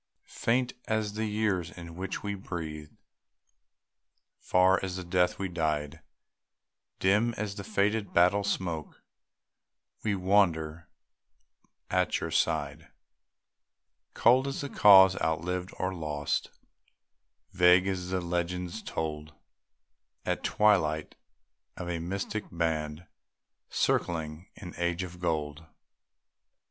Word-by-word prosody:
Faint 125 Hz, +2 st, +1 dB
as 110 Hz, -2 st, -1 dB
the 110 Hz, +1 st, -2 dB
years 105 Hz, -5 st, 0 dB
in 85 Hz, -2 st, -10 dB
which 95 Hz, +2 st, -5 dB
we 100 Hz, 0 st, -2 dB
breathed, 80 Hz, -6 st, -7 dB, 1.4 s
Far 95 Hz, +1 st, +3 dB
as 95 Hz, -1 st, -3 dB
the 95 Hz, -, -5 dB
death 90 Hz, 0 st, +1 dB
we 95 Hz, -, -2 dB
died, 80 Hz, -3 st, -2 dB, 1.0 s
Dim 105 Hz, +5 st, +2 dB
as 105 Hz, -1 st, -3 dB
the 100 Hz, -, -7 dB
faded 100 Hz, +2 st, 0 dB
battle 90 Hz, +4 st, +4 dB
smoke, 85 Hz, -6 st, -3 dB, 1.0 s
We 105 Hz, -2 st, +1 dB
wander 85 Hz, -5 st, +1 dB, 1.0 s
at -, -, +1 dB
your -, -, -4 dB
side; -, -, 0 dB, 1.3 s
Cold 130 Hz, +4 st, +4 dB
as 135 Hz, +1 st, -3 dB
a 140 Hz, -, -4 dB
cause 95 Hz, -4 st, +7 dB
outlived, 90 Hz, +3 st, -1 dB
or 95 Hz, +1 st, -1 dB
lost, 75 Hz, -4 st, -2 dB, 1.0 s
Vague 90 Hz, +1 st, +5 dB
as 90 Hz, -2 st, -2 dB
the 95 Hz, 0 st, -1 dB
legends 90 Hz, +3 st, -3 dB
told 75 Hz, -4 st, -5 dB, 0.9 s
At -, -, -1 dB
twilight, 80 Hz, -8 st, +2 dB, 0.6 s
of 90 Hz, -, -5 dB
a 85 Hz, -1 st, -2 dB
mystic 100 Hz, +5 st, -3 dB
band 80 Hz, -1 st, -2 dB, 0.6 s
Circling 80 Hz, 0 st, -1 dB
an 90 Hz, -4 st, -9 dB
Age 85 Hz, +1 st, -1 dB
of 90 Hz, -1 st, -9 dB
Gold. 80 Hz, -2 st, -2 dB
90 Hz, 110 wpm, -29 LUFS, 80-100 Hz, 1.4 s, cause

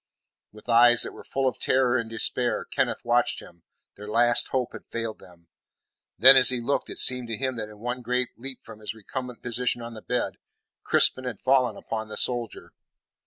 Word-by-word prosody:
With 105 Hz, +2 st, -17 dB
eyes 120 Hz, 0 st, +6 dB
that -, -, -3 dB
were -, -, -13 dB
full 135 Hz, -1 st, -2 dB
of 130 Hz, -, -3 dB
terror 130 Hz, -1 st, +1 dB
and 115 Hz, -2 st, -2 dB
despair, 115 Hz, -1 st, 0 dB
Kenneth -, -, -2 dB
watched -, -, +1 dB
him; 85 Hz, -1 st, -15 dB, 0.3 s
their 105 Hz, +1 st, -11 dB
last 120 Hz, +2 st, +3 dB
hope 130 Hz, -2 st, -2 dB
had -, -, -11 dB
failed 115 Hz, -1 st, -5 dB
them. 85 Hz, -2 st, -19 dB, 0.7 s
Then, 130 Hz, +7 st, +9 dB
as 130 Hz, -2 st, +6 dB
he 125 Hz, -1 st, 0 dB
looked, 120 Hz, +4 st, -2 dB
it -, -, -7 dB
seemed 125 Hz, -1 st, +3 dB
to 115 Hz, -2 st, -4 dB
him 130 Hz, 0 st, -2 dB
that 110 Hz, -1 st, -5 dB
in 105 Hz, -, -14 dB
one 120 Hz, +3 st, -5 dB
great 125 Hz, +1 st, -1 dB
leap 130 Hz, +1 st, -5 dB
from 110 Hz, -1 st, -13 dB
his 110 Hz, +1 st, -7 dB
recumbent 125 Hz, +3 st, -8 dB
position 120 Hz, 0 st, -1 dB
on 115 Hz, 0 st, -8 dB
the 110 Hz, -, -10 dB
bed, 125 Hz, +2 st, -3 dB, 0.4 s
Crispin 130 Hz, -, +2 dB
had 125 Hz, -6 st, -5 dB
fallen 130 Hz, -1 st, +2 dB
upon 110 Hz, -1 st, -5 dB
the 110 Hz, -, -8 dB
soldier. 120 Hz, -3 st, -2 dB
120 Hz, 200 wpm, -25 LUFS, 110-125 Hz, 0.7 s, Then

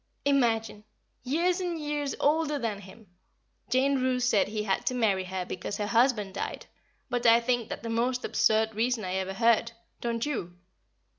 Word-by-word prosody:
_ -, -, -46 dB, 0.2 s
Imagine! 225 Hz, -6 st, +1 dB, 0.4 s
years 345 Hz, +8 st, 0 dB
and 345 Hz, -2 st, -2 dB
years 295 Hz, -2 st, -2 dB
older 300 Hz, 0 st, +2 dB
than 225 Hz, -6 st, -3 dB
him! 205 Hz, +3 st, -14 dB, 0.6 s
Jane 265 Hz, +2 st, +2 dB
Roose 250 Hz, -1 st, +1 dB
said 210 Hz, -5 st, +3 dB
he 210 Hz, 0 st, -3 dB
had 195 Hz, -2 st, 0 dB
to 255 Hz, -, +1 dB
marry 200 Hz, -6 st, +1 dB
her 185 Hz, 0 st, -4 dB
because 185 Hz, +3 st, -5 dB
her 210 Hz, -, -2 dB
husband 225 Hz, -3 st, +2 dB
died; 200 Hz, -, -5 dB, 0.4 s
but 245 Hz, -1 st, 0 dB
I 230 Hz, +1 st, +7 dB
think 235 Hz, -1 st, -1 dB
that -, -, -6 dB
the 230 Hz, -, -4 dB
most 245 Hz, +2 st, 0 dB
absurd 220 Hz, 0 st, +2 dB
reason 225 Hz, 0 st, 0 dB
I 185 Hz, -, -3 dB
ever 190 Hz, 0 st, -2 dB
heard, 230 Hz, +1 st, +3 dB, 0.3 s
don't 235 Hz, 0 st, -1 dB
you? 180 Hz, -12 st, -4 dB
235 Hz, 175 wpm, -28 LUFS, 210-260 Hz, 0.6 s, I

